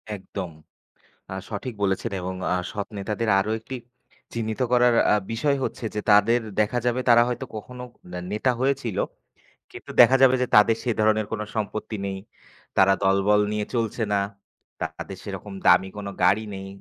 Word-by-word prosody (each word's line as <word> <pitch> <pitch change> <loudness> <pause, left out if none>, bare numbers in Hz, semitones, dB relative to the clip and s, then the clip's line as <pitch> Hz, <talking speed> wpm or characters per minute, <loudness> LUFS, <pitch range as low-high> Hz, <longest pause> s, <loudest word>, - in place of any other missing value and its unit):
একদম। 95 -2 -6 0.8
আ - - -3 0.2
সঠিক 115 +4 -5
বলেছেন 95 0 0
এবং 95 +1 -4 0.2
আ - - +2 0.2
সৎ 100 -1 -4
নেতাদের 105 +3 -2
আরো 105 +3 -1
একটি 130 +4 -7 0.6
চিহ্নিত 110 +1 -3
করার 125 -1 +5 0.2
আ - - +5 0.2
বিষয় 140 +5 +1
হচ্ছে 120 - -4
যে - - 0
তাদের 105 +4 +5 0.2
দেখা 110 +4 +2
যাবে 120 +1 +1
তারা 120 0 +7
হয়তো 125 +2 -3
কখনো 125 +4 -8 0.5
নেতা 110 +5 +1
হয়েছিল। 135 -6 0 0.7
কিন্তু - - -10
দেখা 125 +2 +7
যাবে 130 -1 +7
যে 125 - +1
তাদের 105 +2 +6
সে 125 - 0
ধরনের 110 0 +3
কোন 110 -1 -2
সম্পত্তি 110 0 -3
নেই, 95 -1 -3 0.6
তারা 95 0 +6
দলবল 100 +2 +3
নিয়ে 105 0 -1
চলছে 115 0 -1
না, 100 - +3 0.6
তাদের 80 +4 -5
সেরকম 100 0 -7
দামি 90 +2 +6
কোন 100 -1 -5 0.2
গাড়ি 110 +2 +4
নেই, 95 0 -7
110 Hz, 160 wpm, -24 LUFS, 100-120 Hz, 0.8 s, তারা